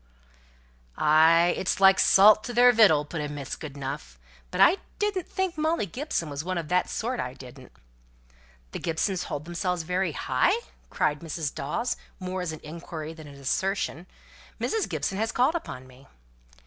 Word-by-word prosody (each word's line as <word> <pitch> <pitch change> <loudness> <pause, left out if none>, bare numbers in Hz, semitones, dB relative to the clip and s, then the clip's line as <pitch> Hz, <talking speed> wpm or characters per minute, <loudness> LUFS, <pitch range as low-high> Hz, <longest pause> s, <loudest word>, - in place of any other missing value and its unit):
"Ay, 165 +3 +5
it's 190 - -1
like 195 0 +6
salt 210 +2 +6
to 240 - -6
their 245 +1 +7
victual," 195 -11 +5
put 150 +1 -5
in 150 0 -4
Mrs. 140 -2 -6
Goodenough. 140 - -7 0.3
"But - - -5
I 370 - +6 0.2
didn't 415 -4 -1
think 375 -4 -2
Molly 315 -6 +1
Gibson 220 - -3
was 145 0 -5
one 185 +1 -3
of 165 -3 -4
that 180 0 +1
sort, 245 +3 -3
I 125 +1 -4
didn't." 130 0 -13 1.0
"The - - -5
Gibsons 175 +3 -1
hold 145 +1 -5
themselves 175 0 -2
very 180 +3 -1
high?" - - +1 0.3
cried 150 0 0
Mrs. 160 -2 -4
Dawes, 155 - -2 0.2
more 185 0 -4
as 180 -3 -3
an 155 - -9
inquiry 160 0 -7
than 160 -2 -12
an 140 - -12
assertion. 180 +5 -2 0.5
"Mrs. 445 -3 -1
Gibson 195 -1 -2
has 220 +1 0
called 255 +6 +2
upon 130 - -6
me." 130 +1 -18
170 Hz, 165 wpm, -26 LUFS, 150-215 Hz, 1.0 s, their